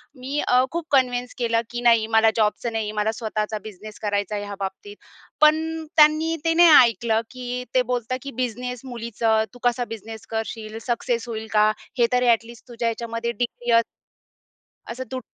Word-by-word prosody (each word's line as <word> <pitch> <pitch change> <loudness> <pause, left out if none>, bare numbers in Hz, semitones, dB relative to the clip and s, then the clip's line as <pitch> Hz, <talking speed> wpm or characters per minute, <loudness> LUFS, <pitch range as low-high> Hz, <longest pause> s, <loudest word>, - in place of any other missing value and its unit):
मी 270 +3 -4
अ, 250 +1 +5
खूप 340 -1 -3
कन्विन्स 250 -2 +1
केलं 230 -2 +1
की 240 0 -5
नाही 230 -2 +4
मला 220 0 +6
जॉबचं 225 +2 0
नाही, 215 -1 -2
मला 210 +1 0
स्वतःचा 215 -1 -3
बिझनेस 215 0 -10
करायचा 205 0 -1
आहे 205 - -3
ह्या 200 0 -6
बाबतीत. 195 +1 -6 0.5
पण 320 +1 +3
त्यांनी 310 +2 +5
ते 330 - +3
नाही 345 0 +7 0.2
ऐकलं, 225 -1 -1
की 250 0 -5
ते 255 - +5
बोलता 245 +1 -1
की 280 - -7
"बिझनेस 250 0 -4
मुलीचं. 230 -2 0
तू 245 - -14
कसा 245 0 +1
बिझनेस 225 0 -8
करशील? 220 -1 -5
सक्सेस 240 0 -1
होईल 220 -1 -5
का? 215 0 +5 0.3
हे 235 - +5
तरी 250 0 +3
ॲटलिस्ट 235 +1 0
तुझ्या 235 -1 -3
ह्याच्यामध्ये 230 0 -3
डिग्री 240 +1 -3
अस" - - 0 1.1
असं 250 +2 -5
तु 260 - -3
235 Hz, 170 wpm, -23 LUFS, 220-250 Hz, 1.1 s, नाही